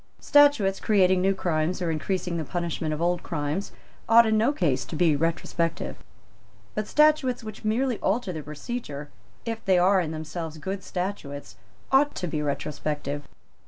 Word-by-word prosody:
Statutes 285 -10 +4
creating 185 -3 +3
new 195 +1 +2
crimes 170 0 -1
or 175 -3 -1
increasing 170 +2 -2
the 160 - -2
punishment 170 -1 -3
of 155 +2 -2
old 175 0 +1
crimes 155 +4 -3 0.4
ought 230 +1 +8
in 220 0 +2
no 225 +5 +3
case 145 - 0
to 120 - -7
be 160 -1 +3
retrospective. 165 +1 -1 0.8
But 215 -1 -3
statutes 300 -5 +3
which 215 0 -8
merely 235 +3 0
alter 195 -2 0
the 155 - -5
procedure, 150 - -6 0.3
if 225 -1 -4
they 190 -2 +4
are 185 +2 +4
in 165 - -3
themselves 160 0 -5
good 190 +5 -5
statutes, 150 - -5 0.4
ought 290 +2 +4
to - - -3
be 155 -3 -2
retrospective. 145 0 -3
180 Hz, 160 wpm, -26 LUFS, 155-215 Hz, 0.8 s, ought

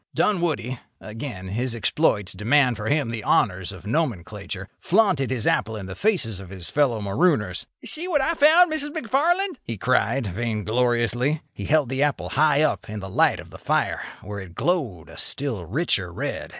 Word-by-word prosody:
Dunwoody—again 125 - -2
his 120 +4 -1
exploits 105 - +1
demand 125 +6 +3
for 105 0 -5
him 145 -3 +1
the 115 -2 -4
honours 95 -1 +1
of 95 0 -12
nomenclature—flaunted 120 - -1
his 125 -4 -2
apple 110 +2 +1
in 100 -3 -6
the 95 - -6
faces 125 - +1
of 95 -2 -10
his 95 -3 -6
fellow 135 -7 +2
marooners. 105 - +1 0.2
"See 330 +3 -2
what 325 -5 +2
I 280 +5 +1
found, 320 +2 +6
Mrs. 295 -1 -1
McFarland!" 315 - 0
he 115 - -4
cried, 130 +3 +1
vaingloriously. 120 - 0
He - - -6
held 150 -4 +2
the 135 +1 -1
apple 145 -1 0
high 150 0 +3
up 150 - -1
in 105 0 -5
the 95 - -7
light - - +3
of - - -11
the - - -11
fire, - - 0 0.2
where 105 -1 -6
it 90 -3 -10
glowed 135 - -1
a - - -13
still 115 - -2
richer 100 - 0
red. 85 - -4
125 Hz, 170 wpm, -24 LUFS, 105-160 Hz, 0.2 s, found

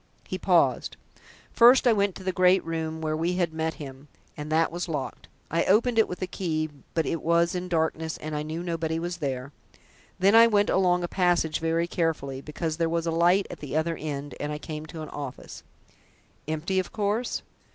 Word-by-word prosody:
He - - -4
paused. - - +2 0.5
"First 245 +3 +6
I 240 - +6
went 200 -2 +1
to 190 - -9
the 185 - 0
great 185 0 +4
room 160 -1 -3
where 155 -1 -1
we 165 +3 0
had 175 -3 0
met 160 0 -2
him, 135 -1 -10 0.3
and 150 0 -6
that 160 +1 +2
was 175 +1 -4
locked. 135 -5 -4 0.2
I 170 +2 +2
opened 230 +4 +3
it 220 - +5
with 180 +1 -5
a - - +1
key, 155 -4 -2 0.2
but 165 - +1
it 165 - -2
was 170 +1 +2
in 180 0 -4
darkness, 160 -1 -1
and 155 0 -5
I 150 - -1
knew 160 +3 -4
nobody 165 -2 -2
was 175 +1 -3
there. 135 -4 -3 0.7
Then 195 +3 +4
I 230 +1 +8
went 205 -2 +2
along 180 -2 +3
a - - -1
passage 175 -4 +1
very 165 +1 +1
carefully, 155 -6 -2
because 155 +2 -4
there 165 -1 +1
was 165 0 -1
a 165 - 0
light 175 +4 +3
at - - -8
the 150 +1 -3
other 165 +1 0
end, 145 -2 -5
and 145 - -3
I 150 - -3
came 155 0 -7
to 160 -1 -7
an 155 - -8
office." 140 -4 -7 0.9
"Empty, 160 +5 -1
of 185 - -3
course?" 215 +3 -1
165 Hz, 205 wpm, -26 LUFS, 155-180 Hz, 0.9 s, I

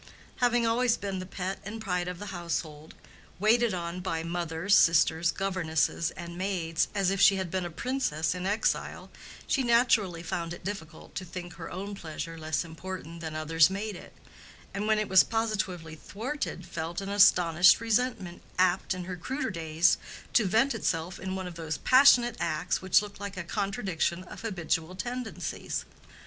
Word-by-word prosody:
Having 240 -1 +2
always 235 +1 +2
been 195 -2 -4
the 185 - -6
pet 190 +1 -4
and 215 +2 -6
pride 180 -4 -2
of 180 -1 -4
the 205 +1 -7
household, 160 -3 -4 0.4
waited 225 +4 +3
on 175 -1 -4
by 165 -3 -2
mother, 170 +1 -3
sisters, 165 -3 +5
governess 170 -4 0
and 170 0 -7
maids, 175 -4 0
as 195 -2 +2
if 195 0 0
she 200 -1 +7
had 190 -3 -3
been 185 -1 -1
a - - -4
princess 170 - -1
in 180 +1 -4
exile, 210 +2 -1 0.3
she 275 - +1
naturally 235 -8 +3
found 170 0 -3
it - - -15
difficult 170 -5 -7
to 190 - -4
think 175 -1 -8
her 165 0 -8
own 200 +3 -5
pleasure 165 -2 -6
less 155 +1 -2
important 170 0 -8
than 160 -1 -5
others 155 +1 +4
made 200 +2 -4
it, - - -13 0.6
and 200 +2 -2
when 215 0 +3
it 215 -1 0
was 190 -1 +7
positively 195 -8 -2
thwarted 240 - -5
felt 165 +2 -4
an 195 0 -5
astonished 180 -3 +6
resentment 225 -5 -1 0.2
apt, 185 0 +2
in 180 - -5
her 180 +1 -5
cruder 260 - -3
days, 165 0 +2 0.3
to 225 - +4
vent 230 +9 +3
itself 165 +1 -2
in 190 0 -4
one 190 -1 -4
of 180 - -6
those 160 -2 -4
passionate 250 -3 +6
acts 155 +3 -1
which 190 +2 +4
look 205 -2 -10
like 200 -1 -6
a 185 - -3
contradiction 190 -2 -2
of 185 - -10
habitual 175 -5 -2
tendencies. 245 +2 -4
185 Hz, 170 wpm, -29 LUFS, 170-205 Hz, 0.6 s, she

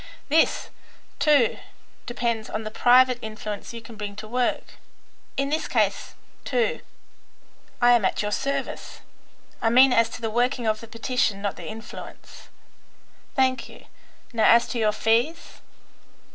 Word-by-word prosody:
This, 320 +3 +2 0.5
too, 290 -6 +3 0.5
depends 235 -2 -2
on 220 - -4
the 215 - -6
private 250 +2 +5
influence 215 -2 -6
you 230 -1 -9
can 225 0 -11
bring 205 -1 -6
to 215 +1 -8
work. 245 +2 -2 0.6
In 275 0 0
this 310 +2 -1
case, - - 0 0.3
too, 245 -4 0 1.0
I 245 0 +5
am 240 -3 +4
at 190 - 0
your 210 - -2
service; 275 +4 -3 0.6
I 225 - +2
mean 255 +2 +6
as 230 -1 +3
to 240 - -9
the 225 -1 -2
working 245 +1 0
of 215 -1 +1
the 230 - -11
petition, 230 -2 -1
not 200 -1 -3
the - - -9
influence." 220 +1 -11 0.9
"Thank 260 -1 +1
you. - - -15 0.5
Now 225 -2 +2
as 235 +1 +6
to 240 - -3
your 215 -1 +3
fees?" 230 +9 0
235 Hz, 145 wpm, -24 LUFS, 220-255 Hz, 1.0 s, mean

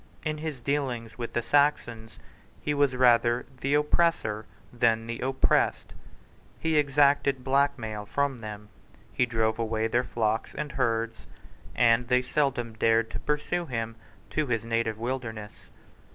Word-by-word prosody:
In 155 -1 -2
his 155 -5 -5
dealings 125 -4 -2
with 120 - -5
the 120 - 0
Saxons, 120 -6 +1 0.4
he 150 - -1
was 140 -3 +2
rather 120 -1 +4
the 140 +2 +1
oppressor 150 -8 +1 0.3
than 115 -2 +2
the 115 0 -5
oppressed. 130 +1 +1 0.6
He 160 -1 -1
exacted 140 -2 +3
black 140 +2 +2
mail 110 -3 -6
from 140 -1 -1
them: 105 -1 -8 0.4
he 125 - +2
drove 110 -1 0
away 110 -1 -1
their 120 +2 +2
flocks 110 -2 -1
and 150 0 -4
herds; 115 -3 -1 0.5
and 120 0 +4
they 125 0 +3
seldom 125 -5 -1
dared 115 +1 +2
to - - -4
pursue 165 +4 -2
him 115 -3 -3 0.4
to 155 -2 0
his 115 -2 -1
native 115 -1 -1
wilderness. 115 -3 -5
120 Hz, 140 wpm, -27 LUFS, 115-140 Hz, 0.6 s, rather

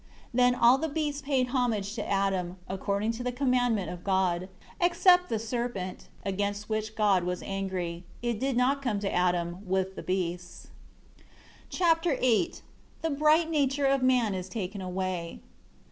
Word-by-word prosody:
9 250 +1 +4
Then 245 0 +4
all 240 +3 +6
the 320 - -1
beasts 295 -1 -2
paid 270 -3 0
homage 230 -6 0
to 225 - -3
Adam, 190 -2 0
according 200 +3 -1
to 230 +2 -6
the 250 - -1
commandment 245 -5 +1
of 175 -1 -8
God; 185 -2 +1 0.3
except 360 0 +4
the 225 - 0
serpent, 220 -4 -4 0.2
against 205 +1 -2
which 215 0 -2
God 200 -4 +3
was 180 0 -3
angry. 185 -3 -3 0.2
It 235 -3 -1
did 265 -1 0
not 270 +3 +2
come 235 -7 -1
to 200 - -2
Adam, 175 -1 +1
with 190 0 0
the - - -6
beasts. 180 -1 -3 1.0
Chapter 330 -3 +2
VIII 255 +7 +2 0.5
The 325 - 0
"Bright 310 +3 +3
Nature" 285 -2 +1
of 275 0 +3
man 250 -5 +3
is 185 0 -5
taken 200 -1 -4
away. 185 -2 -3
215 Hz, 160 wpm, -28 LUFS, 190-260 Hz, 1.0 s, all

